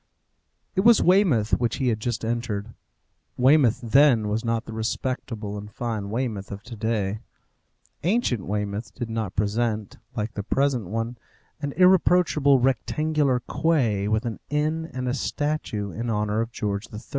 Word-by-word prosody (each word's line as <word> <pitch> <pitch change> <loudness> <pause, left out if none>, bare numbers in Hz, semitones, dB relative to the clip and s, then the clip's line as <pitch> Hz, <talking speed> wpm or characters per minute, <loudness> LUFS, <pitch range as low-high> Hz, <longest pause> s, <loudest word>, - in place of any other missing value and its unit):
It 190 - +2
was 230 +2 +6
Weymouth 170 - +3
which 120 -2 0
he 130 -2 0
had 110 -2 0
just 115 0 -2
entered. 115 -2 -3 0.6
Weymouth 130 -2 +4
then 120 -3 +4
was 110 +3 -1
not 115 -1 -1
the 115 - -8
respectable 110 -2 -3
and 105 +1 -9
fine 110 -4 -3
Weymouth 110 -4 -3
of 100 +1 -7
to 120 0 -9
day. 110 -2 -1 0.8
Ancient 170 - 0
Weymouth 105 +1 -3
did 120 -3 -5
not 110 -4 -3
present, 105 0 -1 0.2
like 110 -1 -3
the 100 - -3
present 130 -1 0
one, 115 +4 -3 0.4
an 145 -1 -2
irreproachable 180 -6 +4
rectangular 135 +2 +1
quay, 120 -11 +1
with 110 +2 0
an 115 -2 -4
inn 155 +2 0
and 130 0 -4
a 125 - 0
statue 140 -8 -2
in 115 +4 -4
honour 105 0 0
of 115 +1 -4
George 105 -2 -3
III. 105 - -6
115 Hz, 155 wpm, -25 LUFS, 105-140 Hz, 0.8 s, was